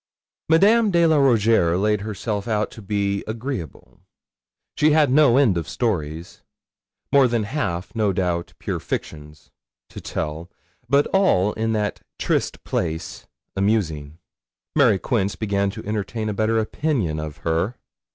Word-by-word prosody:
Madame 210 Hz, +7 st, +5 dB
de 170 Hz, -3 st, +3 dB
la 160 Hz, -2 st, +4 dB
Rougierre 115 Hz, -10 st, +3 dB
laid 105 Hz, +1 st, +1 dB
herself 105 Hz, 0 st, -4 dB
out 105 Hz, -2 st, 0 dB
to 115 Hz, -, -11 dB
be 100 Hz, -1 st, -1 dB
agreeable; 110 Hz, -, -6 dB, 0.8 s
she 150 Hz, 0 st, +3 dB
had 150 Hz, -4 st, +4 dB
no 140 Hz, -3 st, +5 dB
end 120 Hz, -11 st, +4 dB
of 80 Hz, -4 st, -7 dB
stories 85 Hz, -8 st, -3 dB, 0.7 s
more 140 Hz, -2 st, +5 dB
than 115 Hz, -2 st, 0 dB
half, 100 Hz, -, -3 dB
no 105 Hz, -3 st, +2 dB
doubt, 90 Hz, -2 st, -2 dB
pure -, -, -4 dB
fictions 75 Hz, 0 st, -7 dB, 0.4 s
to -, -, -9 dB
tell, 80 Hz, +3 st, -4 dB, 0.4 s
but 140 Hz, +2 st, +4 dB
all, 105 Hz, -, +3 dB
in 110 Hz, 0 st, -1 dB
that 105 Hz, -1 st, -2 dB, 0.2 s
triste -, -, -1 dB
place, 85 Hz, 0 st, -4 dB, 0.3 s
amusing. 85 Hz, -8 st, -1 dB, 0.6 s
Mary 125 Hz, -10 st, +5 dB
Quince 100 Hz, 0 st, -1 dB
began 100 Hz, -2 st, 0 dB
to 110 Hz, +2 st, -8 dB
entertain 110 Hz, +1 st, -3 dB
a -, -, -2 dB
better 110 Hz, +2 st, +1 dB
opinion 110 Hz, -, -1 dB
of 75 Hz, -1 st, -6 dB
her. 85 Hz, +8 st, 0 dB
105 Hz, 140 wpm, -22 LUFS, 90-120 Hz, 0.8 s, Madame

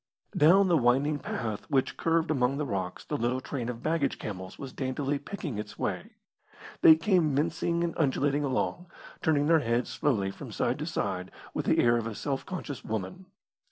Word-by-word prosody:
Down 185 Hz, +6 st, +6 dB
the 170 Hz, -3 st, +4 dB
winding 135 Hz, +5 st, +2 dB
path 110 Hz, -5 st, -4 dB
which 135 Hz, -3 st, +1 dB
curved 165 Hz, 0 st, +1 dB
among 135 Hz, -1 st, +1 dB
the 150 Hz, -, -1 dB
rocks 95 Hz, -7 st, -4 dB
the 150 Hz, -, -2 dB
little 125 Hz, +1 st, 0 dB
train 130 Hz, -2 st, -4 dB
of 120 Hz, -1 st, -6 dB
baggage 155 Hz, -3 st, 0 dB
camels 95 Hz, -3 st, -7 dB
was 135 Hz, -2 st, -8 dB
daintily 140 Hz, +1 st, -2 dB
picking 145 Hz, -, -5 dB
its 105 Hz, -1 st, -7 dB
way. -, -, -3 dB, 0.7 s
They 160 Hz, -, +9 dB
came 165 Hz, -3 st, +2 dB
mincing 170 Hz, +3 st, 0 dB
and 170 Hz, -, -1 dB
undulating 145 Hz, -1 st, +1 dB
along, 145 Hz, +6 st, -1 dB, 0.3 s
turning 145 Hz, -2 st, +2 dB
their 165 Hz, +1 st, +5 dB
heads 120 Hz, -2 st, 0 dB
slowly 115 Hz, -6 st, 0 dB
from -, -, -9 dB
side -, -, -1 dB
to -, -, -3 dB
side 90 Hz, +1 st, -2 dB, 0.2 s
with -, -, -3 dB
the -, -, +3 dB
air 120 Hz, 0 st, +4 dB
of 115 Hz, -1 st, -2 dB
a 110 Hz, -, -5 dB
self 135 Hz, +3 st, -3 dB
conscious 165 Hz, -7 st, -5 dB
woman. 110 Hz, -, -5 dB
140 Hz, 185 wpm, -29 LUFS, 120-160 Hz, 0.7 s, They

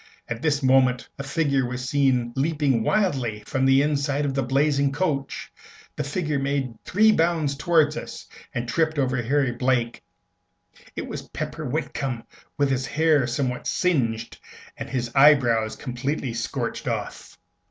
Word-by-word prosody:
At 120 Hz, 0 st, -5 dB
this 150 Hz, -3 st, +1 dB
moment 130 Hz, -2 st, +3 dB
a -, -, -3 dB
figure 140 Hz, -2 st, +1 dB
was 125 Hz, +1 st, -4 dB
seen 130 Hz, -4 st, +1 dB
leaping 140 Hz, -3 st, +1 dB
wildly 125 Hz, -, 0 dB
from 135 Hz, +3 st, 0 dB
the 135 Hz, +1 st, +5 dB
inside 145 Hz, -1 st, 0 dB
of 140 Hz, -, -1 dB
the 135 Hz, -, 0 dB
blazing 140 Hz, +2 st, +2 dB
coach. 140 Hz, -3 st, -2 dB, 0.4 s
The -, -, -2 dB
figure 150 Hz, 0 st, -2 dB
made 135 Hz, -3 st, -1 dB
three 215 Hz, +3 st, +4 dB
bounds 165 Hz, -5 st, +1 dB
towards 155 Hz, 0 st, +2 dB
us, -, -, -7 dB, 0.3 s
and 120 Hz, 0 st, -3 dB
tripped 160 Hz, +4 st, 0 dB
over 130 Hz, -2 st, +1 dB
Harry 135 Hz, +2 st, +1 dB
Blake. 120 Hz, -1 st, 0 dB, 0.9 s
It -, -, -4 dB
was -, -, -7 dB
Pepper 155 Hz, -, -5 dB
Whitcomb, 135 Hz, -3 st, -3 dB, 0.3 s
with 140 Hz, -1 st, +2 dB
his 130 Hz, 0 st, -1 dB
hair 155 Hz, -4 st, +2 dB
somewhat 125 Hz, 0 st, -2 dB
singed, 125 Hz, -11 st, 0 dB, 0.4 s
and -, -, -7 dB
his 120 Hz, -2 st, -2 dB
eyebrows 125 Hz, -6 st, +4 dB
completely 130 Hz, 0 st, -3 dB
scorched 120 Hz, 0 st, -3 dB
off! -, -, -4 dB
135 Hz, 145 wpm, -24 LUFS, 125-150 Hz, 0.9 s, the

